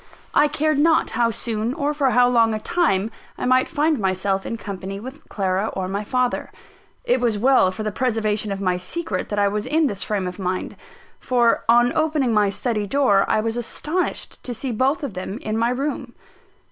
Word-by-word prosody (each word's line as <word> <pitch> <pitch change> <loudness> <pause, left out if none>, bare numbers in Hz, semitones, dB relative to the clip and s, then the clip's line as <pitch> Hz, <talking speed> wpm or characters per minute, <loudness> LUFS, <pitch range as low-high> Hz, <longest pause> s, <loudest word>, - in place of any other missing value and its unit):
I 295 - +5
cared 305 0 0
not 320 +1 +3
how 235 0 +2
soon, 225 +2 -1
or 295 -1 -1
for 285 -3 +1
how 245 0 +4
long 230 -3 +3
a - - -3
time, 225 - 0 0.3
I - - -3
might 255 +1 +3
find 310 -2 +1
myself 190 0 -1
in 230 - -3
company 195 -1 -6
with 265 +7 -10
Clara 195 +1 -1
or 185 -1 -3
my 200 +2 -3
father. 250 +2 -1 0.5
It - - +1
was 230 -3 +1
well 255 -3 +4
for 185 +4 -5
the 215 - -2
preservation 215 -3 -1
of 195 - -3
my 185 -2 0
secret 320 - -4
that 205 - -3
I 205 0 +3
was 210 +1 -2
in 315 +1 +2
this 205 -8 -2
frame 205 -3 -1
of 180 +2 -6
mind; 185 -1 -3 0.4
for, 240 -2 +2
on 240 +1 +5
opening 305 -6 +1
my 210 -2 +3
study 210 0 -2
door, 205 -7 +3
I 215 - +2
was 225 +1 -2
astonished 305 +9 -3
to 245 - -4
see 255 +3 -4
both 265 +8 0
of 270 -7 -4
them 185 +3 -5
in 215 -3 -4
my 230 +1 +1
room. 265 -1 -3
230 Hz, 200 wpm, -22 LUFS, 200-270 Hz, 0.5 s, I